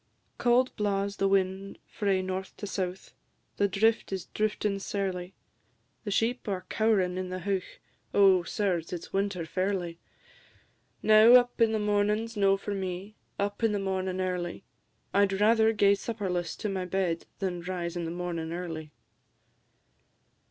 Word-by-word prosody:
Cauld 250 +1 +3
blaws 200 -1 -1
the 195 - +2
wind 195 0 0
frae 195 -3 0
north 185 0 -5
to - - -5
south; 190 -2 -4 0.4
The 200 - +3
drift 220 +4 +1
is 190 -3 -3
drifting 210 -1 -1
sairly; 190 -2 -3 0.7
The - - -2
sheep 230 +5 0
are 190 -3 -3
cow'rin' 195 -5 +2
in 185 -1 -4
the 185 0 -4
heuch; 195 0 -3 0.3
Oh, 195 -2 +5
sirs, 175 -2 -1
it 175 -2 -4
's - - -13
winter 195 -3 -1
fairly! 185 -1 -2 1.0
Now, 220 +2 +7
up 245 -1 +4
in 225 -1 +5
the 220 - +1
mornin's 210 +2 0
no 195 -1 +3
for 205 +1 -4
me, 190 +1 -4 0.2
Up 200 +2 -2
in 225 -2 +2
the 205 - 0
mornin' 190 -1 -2
early; 180 0 -3 0.5
I'd 195 -1 +3
rather 220 +1 +5
gae 200 -2 +4
supperless 195 -5 -3
to 215 - -1
my 190 -2 -2
bed 180 -2 -1
Than 180 -3 -3
rise 175 -1 -4
in 175 -1 -2
the - - -3
mornin' 170 -2 -4
early. 165 -3 -5
195 Hz, 150 wpm, -29 LUFS, 180-205 Hz, 1.0 s, Now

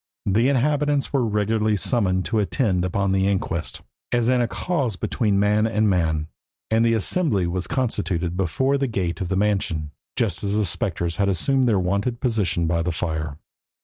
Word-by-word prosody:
The 110 +7 +3
inhabitants 145 +1 +1
were 135 -3 +2
regularly 105 0 +1
summoned 95 -4 +1
to 110 - 0
attend 100 -3 0
upon 100 +2 0
the 95 0 +2
inquest, 95 -4 -2 0.3
as 120 -1 +2
in 125 -1 +3
a 120 - +1
cause 135 - -2
between 100 +1 0
man 105 +2 +3
and 110 -1 +1
man, 80 -5 +1 0.5
and 110 +1 +3
the 115 0 +3
assembly 110 - +1
was 90 0 -2
constituted 95 -9 -1
before 130 +10 +1
the 135 - +1
gate 90 -7 -2
of 90 - -1
the 95 - 0
mansion, 95 -7 0 0.2
just - - -1
as 100 0 0
the 105 - +2
spectres 85 -2 -2
had 100 -1 +2
assumed 130 - +1
their 110 -4 +3
wonted 100 +6 0
station 90 -6 0
by 85 0 +1
the 90 +2 -1
fire. 80 -3 -3
100 Hz, 180 wpm, -23 LUFS, 90-115 Hz, 0.5 s, The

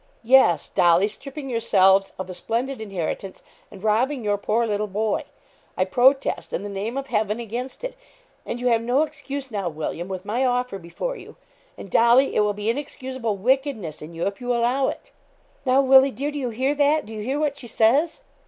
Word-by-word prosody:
'Yes, 230 - +5
Dolly, 175 +1 +4
stripping 275 +6 -8
yourselves 195 -5 +3
of 190 - -5
a 185 - -7
splendid 230 +7 -3
inheritance, 195 -1 -5 0.3
and 200 -1 -13
robbing 240 +5 +1
your 205 -1 +1
poor 215 +3 0
little 210 -1 -1
boy. 210 +1 -1 0.5
I 185 - +2
protest, 260 +7 +2
in - - -2
the 205 - -5
name 205 +6 -4
of 275 - -3
Heaven, 215 -3 -1
against 240 - -6
it, - - -4 0.5
and 240 - -5
you 250 - -5
have 230 -1 +3
no 250 +6 +2
excuse 285 -3 -6
now, 200 -4 -2
William, 160 +2 -5
with 190 0 -6
my 235 +6 0
offer 250 -5 0
before - - -5
you; 435 +2 -12 0.4
and, 195 - -10
Dolly, 240 +4 +4
it - - +3
will 210 0 +2
be 205 +1 -5
inexcusable 260 -4 -4
wickedness 240 - -1
in 160 +2 -9
you, 165 - -2
if 200 +2 -3
you 245 0 -2
allow 250 +3 +1
it.' - - -6 0.6
'Now, 260 +2 +4
Willie 265 +1 +7
dear, 280 +3 -3
do 295 - -4
you 255 -3 -2
hear 260 +5 0
that 295 +1 +2
do 220 - -9
you 215 - -5
hear 265 +7 -2
what 295 -2 0
she 240 - -8
says?' 255 +9 +2
235 Hz, 200 wpm, -23 LUFS, 200-270 Hz, 0.6 s, Willie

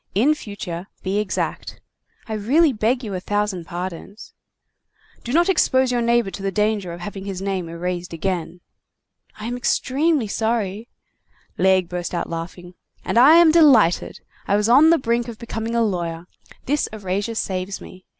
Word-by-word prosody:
In 260 +10 +4
future, 195 - -7 0.2
be 195 +2 0
exact." 210 -3 -3 0.5
"I 220 - -4
really 270 +9 +3
beg 240 +4 0
you 210 -3 -5
a 185 - -2
thousand 205 -2 -2
pardons." 180 +4 -7 0.9
"Do 240 - -5
not 340 +5 +3
expose 260 -8 +2
your 245 -1 0
neighbor 235 -3 +2
to 195 - -8
the 195 0 -2
danger 210 -2 0
of 170 +1 -8
having 195 +1 -7
his 195 -2 -5
name 190 -3 -3
erased 175 +1 -4
again." 175 0 -3 0.8
"I 215 - -6
am 240 +1 -3
extremely 270 +2 +1
sorry—" 220 0 -2 0.7
Laigle 190 -1 +3
burst 180 0 -4
out 170 - -3
laughing. 175 +2 -7 0.3
"And 230 - +2
I 285 +6 +8
am 340 -2 +7
delighted. 270 - +4 0.3
I 200 - +2
was 210 +1 +1
on 275 +7 +6
the 335 - +5
brink 235 -2 -1
of 235 -2 -8
becoming 230 0 -4
a 235 - +3
lawyer. 170 -5 -3 0.4
This 295 +3 0
erasure 205 +1 -3
saves 190 -2 -3
me. 185 0 -13
205 Hz, 165 wpm, -21 LUFS, 185-240 Hz, 0.9 s, I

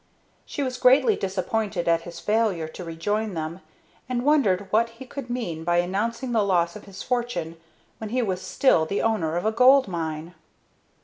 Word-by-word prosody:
She 285 - -3
was 255 -1 -3
greatly 270 - +5
disappointed 195 - -2
at 165 0 +3
his 170 0 -9
failure 210 -7 0
to 170 +3 -9
rejoin 205 +5 -2
them, 160 +3 -4 0.5
and 250 0 -1
wondered 215 -11 +3
what 230 +2 +3
he 230 +3 -12
could 260 -1 -8
mean 185 -10 -3
by 175 +1 +1
announcing 225 +8 -1
the 225 -2 +3
loss 180 -3 +1
of 210 - -10
his 195 -1 -9
fortune 235 -10 -2 0.4
when 220 - -5
he 250 +2 0
was 185 -4 -2
still 185 - +2
the 200 - -1
owner 175 -8 0
of 175 - -2
a 220 - +3
gold 255 +3 +6
mine. 165 -2 -4
205 Hz, 180 wpm, -25 LUFS, 175-240 Hz, 0.5 s, gold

